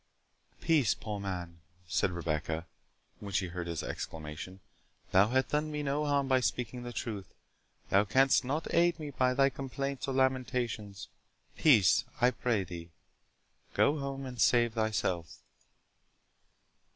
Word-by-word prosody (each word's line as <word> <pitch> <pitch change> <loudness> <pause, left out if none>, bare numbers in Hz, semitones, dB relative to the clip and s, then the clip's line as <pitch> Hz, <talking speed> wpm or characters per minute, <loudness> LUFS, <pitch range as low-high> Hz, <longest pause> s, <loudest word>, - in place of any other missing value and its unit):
"Peace, 155 -9 +3
poor 105 -1 -5
man," 90 -4 -5 0.3
said 85 +3 +1
Rebecca, 80 -1 -2 0.5
when 100 -1 -8
she 95 -1 0
heard 90 0 -5
his 85 -2 -3
exclamation; 80 +4 -6 0.5
"thou 95 +2 +6
hast 130 +3 +1
done 150 +1 0
me 150 0 -3
no 145 +2 0
harm 140 -1 +2
by 130 -1 +4
speaking 125 -1 -2
the 120 0 -6
truth—thou 105 -2 -3
canst 135 +5 +4
not 145 +6 -3
aid 170 0 +3
me 150 -2 -5
by 130 -1 +1
thy 135 0 +4
complaints 135 +1 -4
or 135 - -2
lamentations. 125 -6 -1 0.5
Peace, 105 - +5 0.2
I 125 +1 +5
pray 115 -4 0
thee—go 85 - -4
home 135 0 -4
and 125 -3 -5
save 120 -2 +4
thyself." 105 -7 -1
120 Hz, 130 wpm, -31 LUFS, 95-135 Hz, 0.5 s, thou